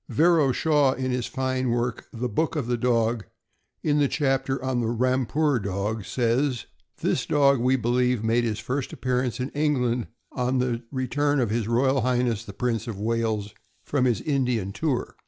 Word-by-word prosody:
Vero 160 -4 +4
Shaw, 145 -1 +3
in 130 -1 -2
his 125 -2 -1
fine 130 -1 -1
work 120 0 -1
"The 120 +1 -3
Book 155 +9 -1
of 145 -6 -1
the 120 +1 0
Dog," 115 -3 +1 0.6
in 150 -1 +2
the 145 - +4
chapter 135 -2 0
on 130 -2 0
the 115 - -1
"Rampur 130 +4 +1
Dog," 100 +1 -3
says: 125 +3 0 0.4
This - - 0
dog, 140 -2 +4
we 130 +2 +3
believe, 125 -1 +1
made 115 +2 +2
his 110 -3 -1
first 125 +4 -3
appearance 125 -1 -1
in 130 +2 -2
England 125 -5 0 0.2
on 125 0 0
the 125 -2 0
return 145 +2 0
of 120 -5 0
H. 115 -1 -1
R. 130 +1 +2
H. 120 -3 0
the - - -6
Prince 115 0 -2
of 105 -4 -5
Wales 110 -2 -1 0.3
from 140 -3 0
his 120 -4 +1
Indian 125 -9 0
tour. 145 0 -2
125 Hz, 175 wpm, -25 LUFS, 115-135 Hz, 0.6 s, Vero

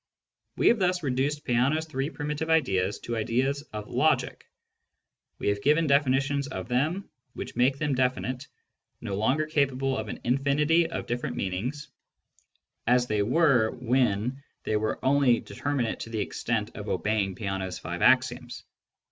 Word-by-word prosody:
We - - +3
have 235 - +3
thus 180 -2 +1
reduced 140 +2 -1
Peano's 135 +6 +2
three 140 -2 -3
primitive 150 0 -4
ideas 105 -12 +2
to 120 - -4
ideas 125 +5 0
of 105 -1 -6
logic: - - 0 0.9
we - - -1
have 100 0 -1
given 150 +5 +3
definitions 140 0 +2
of - - -6
them 150 +10 0 0.3
which - - -6
make 130 +3 +3
them 150 -1 0
definite, 130 +1 -1 0.5
no 100 - -5
longer 130 +9 +1
capable 135 -3 0
of 110 -3 -3
an - - -6
infinity 145 +6 +2
of 165 - -4
different 120 +1 -3
meanings, 120 +11 -3 1.0
as 125 0 +4
they 105 -3 0
were 125 -1 +3
when 125 0 0 0.2
they 110 - -1
were 110 +1 0
only 135 -3 +4
determinate 140 -6 -2
to - - -6
the 110 -1 -3
extent - - -2
of - - -6
obeying 105 -3 0
Peano's 95 -3 -3
five 85 +2 -6
axioms. 125 -1 +2
130 Hz, 150 wpm, -27 LUFS, 110-145 Hz, 1.0 s, as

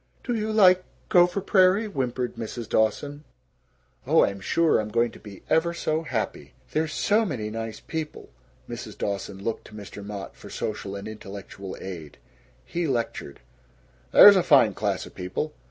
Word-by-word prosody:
"Do 245 - -2
you 220 -1 -1
like 185 -4 +6 0.3
Gopher 180 -1 +4
Prairie?" 190 +2 +4
whimpered 125 - -2
Mrs. 115 0 -6
Dawson. 145 +7 0 0.8
"Oh, - - +5
I'm 100 0 -4
sure 160 - +2
I'm 110 0 -3
going 115 +1 +1
to - - -14
be 100 -3 -12
ever 170 +1 +2
so 155 -1 -1
happy." 125 -9 -4 0.2
"There's 155 0 0
so 210 +8 +2
many 120 - -3
nice 115 0 -5
people." 160 - -6 0.4
Mrs. - - -7
Dawson 100 -1 -4
looked 115 - -3
to 105 - -13
Mr. 100 -1 -9
Mott 100 -1 -7
for - - -12
social 100 -2 -4
and 100 +1 -6
intellectual 100 -2 -8
aid. 85 -6 -8 0.5
He 170 -1 -2
lectured: 115 - -3 0.7
"There's 205 0 +10
a 190 - +4
fine 135 - +5
class 100 -2 -2
of - - -13
people. 95 +12 -4
120 Hz, 160 wpm, -25 LUFS, 105-170 Hz, 0.8 s, There's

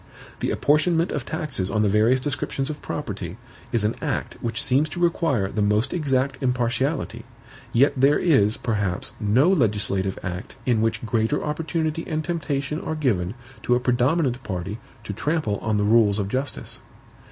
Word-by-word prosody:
The - - -1
apportionment 165 +4 +2
of 130 - -3
taxes 140 - -2
on 105 +1 +1
the - - +3
various 110 +6 +4
descriptions 135 +1 -2
of 150 - -8
property 100 - -5 0.3
is 115 -3 +1
an 105 - +2
act - - -2
which 115 -2 -2
seems 140 +4 +2
to 175 - -6
require 165 - +1
the 105 - -1
most 105 +2 +2
exact 135 -4 0
impartiality; 125 -1 0 0.5
yet 135 +5 +4
there 140 +3 +4
is, 115 - +3
perhaps, 100 -6 -1
no 120 - +4
legislative 100 - +1
act 90 0 -5
in 120 -4 +2
which 115 +1 0
greater 115 +4 0
opportunity 160 +1 -2
and 155 -1 -2
temptation 150 -3 -2
are 160 - -3
given 110 - 0 0.3
to 125 - +2
a - - +2
predominant 125 +2 +1
party 95 0 -4 0.2
to 100 - -5
trample 145 - -1
on 110 -1 0
the 105 - +1
rules 105 -2 +4
of 100 -2 -1
justice. 130 +5 -3
125 Hz, 165 wpm, -24 LUFS, 105-150 Hz, 0.5 s, various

